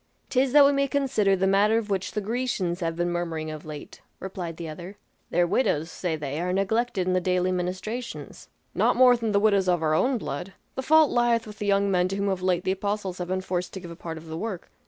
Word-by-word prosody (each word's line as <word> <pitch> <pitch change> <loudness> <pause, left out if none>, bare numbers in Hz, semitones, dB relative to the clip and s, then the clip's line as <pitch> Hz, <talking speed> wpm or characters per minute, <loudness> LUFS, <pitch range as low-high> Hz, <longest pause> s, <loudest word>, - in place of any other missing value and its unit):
"'Tis 260 0 +2
that 290 +1 +8
we 280 - +5
may 275 0 +1
consider 255 -8 +2
the 190 0 0
matter 200 +3 +4
of 215 -2 -3
which 190 -1 -2
the 210 - -1
Grecians 215 -5 -2
have 165 -2 -2
been 175 +1 -1
murmuring 165 -2 -3
of 155 0 -8
late," 150 -1 -9 0.2
replied 180 -4 -6
the 170 - -6
other. 175 +6 -8 0.3
"Their 175 - +2
widows, 165 - 0
say 175 -3 -2
they, 150 0 -4
are 180 +1 -1
neglected 195 +1 0
in 185 - +1
the 185 - +2
daily 180 0 +1
ministrations." 185 +7 -5 0.2
"Not - - +2
more 255 -1 +7
than 230 -2 -2
the 200 - +3
widows 200 -3 +3
of 175 -2 +1
our 155 -1 +2
own 250 +11 +2
blood; 180 -1 -5 0.2
the 265 - -3
fault 310 +2 +5
lieth 240 -1 +2
with 210 -1 -11
the 205 - -3
young 200 0 +2
men 180 -1 +2
to 195 - -3
whom 200 0 0
of 190 -1 -2
late 180 -1 +1
the 185 - +1
apostles 195 -1 -3
have 180 - -3
been 185 +1 -1
forced 180 -1 -3
to 190 - -5
give 175 -2 -9
a - - -8
part 165 -1 -7
of 160 - -11
the 160 0 -6
work. 205 -5 -5
190 Hz, 245 wpm, -26 LUFS, 175-220 Hz, 0.3 s, that